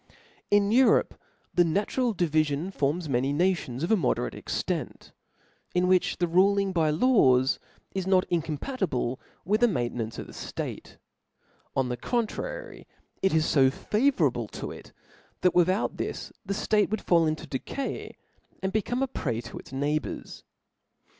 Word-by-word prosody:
In 205 0 +4
Europe 255 +3 +4 0.4
the 180 - +4
iiatitral 205 +7 +1
divifion 155 +1 +1
forms 155 +3 0
many 135 0 +1
na* 180 +6 +3
tions 130 -5 -6
of 170 - 0
a - - +7
moderate 110 - 0
emdnt, - - -4 0.6
in 180 0 +3
which 185 -1 +2
the 175 - +1
ruling 195 +3 +3
by 160 -3 +2
la^s 135 - +4 0.3
is 190 -1 -2
not 185 -1 +4
incompatible 160 - -1 0.3
with 210 +5 +1
the 240 - +6
matote* 120 - -1
nance 115 -1 -4
of - - -5
c4^e - - -9
ftate: - - -5 0.8
on 130 -2 +1
the 125 - -2
contriry, 480 - -3 0.3
it 190 - +3
is 160 0 +2
fe 135 -3 +6
fatrour^^ 250 - +1
able - - -5
to - - -6
it, - - -11 0.5
chat 180 - +4
without 185 +4 +2
this^ - - -4
the 200 - -3
fbte 210 0 +2
would 220 - -2
fall 170 -2 +3
in^ 155 0 0
to - - -9
decay^ 275 -1 -5 0.5
and 190 0 -1
become 240 +5 0
a - - +1
prey 120 - -2
to - - -8
its - - -13
neighbours. 145 +3 -3
180 Hz, 160 wpm, -27 LUFS, 145-205 Hz, 0.8 s, a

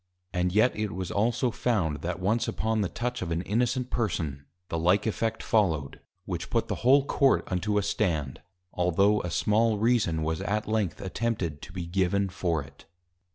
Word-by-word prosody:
And 90 0 +1
yet 110 +6 +3
it 105 -1 -2
was 95 0 -4
also 120 +4 +1
found 95 -12 0
that 85 +4 -4
once 105 +6 +1
upon 110 0 0
the 95 - 0
touch 125 +1 -3
of 90 - -3
an 85 +1 -1
innocent 125 +4 0
person, 80 - -2 0.2
the 85 - -2
like 90 +5 +3
effect 115 0 -1
follow'd, 80 -11 +1 0.3
which 85 -2 -4
put 115 - 0
the - - -1
whole 135 +3 +5
Court 140 -1 +3
unto 100 +3 0
a 105 - +2
stand: 80 -11 -1 0.3
altho' 95 +4 +3
a 90 - -4
small 110 +5 +2
Reason 105 -8 +2
was 80 0 -1
at 105 +1 -1
length 110 -5 -1
attempted 95 -6 -2
to - - -10
be 90 -1 -5
given 95 +2 +1
for 85 -4 -1
it. 70 0 -17
100 Hz, 180 wpm, -28 LUFS, 85-110 Hz, 0.3 s, whole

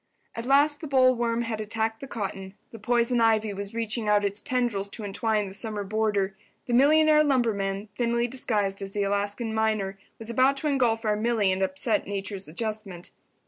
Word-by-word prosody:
At 230 +2 -6
last 290 +2 +3
the 310 - -5
bollworm 245 -3 +2
had 225 -2 -3
attacked 220 +1 -2
the 275 - -8
cotton—the 195 0 -7
poison 240 +2 +1
ivy 220 -2 +2
was 200 +2 -7
reaching 225 -1 -1
out 205 -1 +3
its 200 +1 +2
tendrils 240 -7 -1
to 215 - -7
entwine 210 +1 -1
the 190 - -8
summer 210 0 -2
boarder—the 205 +2 -3
millionaire 305 +4 +5
lumberman, 215 -7 0
thinly 235 0 0
disguised 210 -6 -1
as 195 0 -6
the 205 - 0
Alaskan 205 +3 -1
miner, 215 -3 -1 0.2
was 225 +1 -2
about 260 +4 +3
to 300 - -2
engulf 240 -5 +1
our 210 -1 +2
Milly 215 -2 +1
and 185 +1 -1
upset 190 +3 0
Nature's 195 -1 -4
adjustment. 195 0 -4
220 Hz, 170 wpm, -26 LUFS, 200-240 Hz, 0.2 s, millionaire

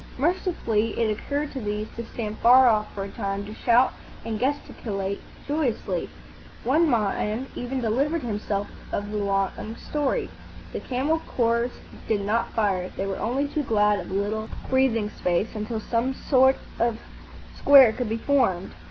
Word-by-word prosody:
Mercifully, 275 - 0
it 225 -2 +2
occurred 285 +7 -2
to 270 - -5
these 210 0 -2
to 235 - -4
stand 220 -2 -5
far 255 +2 +7
off 215 -2 +2
for 195 - -3
a 200 - -6
time, 200 -2 -3
to 210 - -8
shout 240 +3 +3 0.3
and 220 -2 -3
gesticulate 210 -7 -2 0.3
joyously. 290 -5 -1 0.5
One 310 +6 +3
man 215 +1 0
even 255 +1 -3
delivered 275 +8 0
himself 205 -3 -2 0.2
of 205 +1 -3
a - - -1
long 200 +2 -1
story. 300 - -1 0.5
The - - -2
camel 275 +6 0
corps 235 -3 0 0.4
did 215 -2 +1
not 220 +4 0
fire. 190 -4 +1
They 195 - -1
were 195 -1 -3
only 265 +6 0
too 300 +1 -1
glad 210 -5 +2
of 175 - -7
a 190 - -3
little 215 +2 -1 0.2
breathing 235 -5 +2
space, 180 +5 0
until 220 +1 -3
some 235 +4 -1
sort 265 -1 +4 0.2
of 235 -1 +1 0.6
square 270 -5 +7
could 245 -2 -3
be 225 - -1
formed. 230 -9 +1
230 Hz, 160 wpm, -25 LUFS, 210-260 Hz, 0.6 s, far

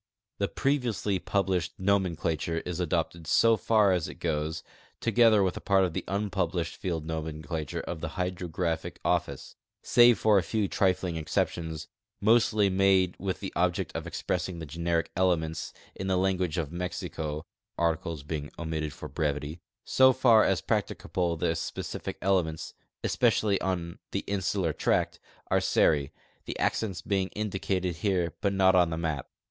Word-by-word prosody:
The - - +1
previou 135 -5 0
sly 100 -2 -1
publi.shed 90 -1 0
nomenclature 85 -4 0
is 90 -1 -5
ado[)ted 85 -1 -1
so 115 +6 +5
far 105 -3 +3
as 90 -4 +1
it - - -8
goes, 80 -2 -2 0.4
together 115 -2 +4
with 95 -2 0
a - - -6
part 95 -1 +3
of 90 -3 0
the - - -3
unpublished 100 +1 -1
field 85 -4 -3
nomenclature 80 -1 -4
of 80 -2 -6
the - - -5
Hydrographic 90 -2 -2
Office, - - -1 0.3
save 120 -2 +6
for 105 -1 +4
a - - +1
few 105 +4 -1
tritling 90 -4 +1
exceptions 80 0 -2 0.3
mostly 110 -1 +4
made 95 -1 +3
with 95 0 -3
the 95 - -5
object 90 0 0
of - - -4
expressing 90 0 -2
the 80 - -6
generic 85 +2 -1
elements 85 -3 0 0.2
in 95 - -5
the 95 -1 +2
language 95 -2 0
of 80 -3 -2
Mexico 85 -3 -4 0.3
(articles 80 -2 -1
being 75 -1 -4
omitted 80 -2 -3
for - - -8
brevity) 75 +2 -2 0.2
So 130 0 +5
far 120 -4 +5
as 95 -4 +2
practicable 85 -2 -1
the 85 +1 0
s))ecific 80 0 -4
elements, 90 -5 0 0.3
especially 100 -3 +2
on 85 -3 -2
the - - -1
insular 95 -4 0
tract, - - 0 0.3
are - - +4
Seri, 70 -3 +2 0.3
the - - -5
accents 100 -6 -1
being 95 -2 0
indicated 95 -4 -2
here 90 -5 0
but 100 - +2
not 95 -1 +4
on 90 -2 +4
the 80 - -3
map. 80 -5 -2
90 Hz, 155 wpm, -28 LUFS, 80-95 Hz, 0.4 s, save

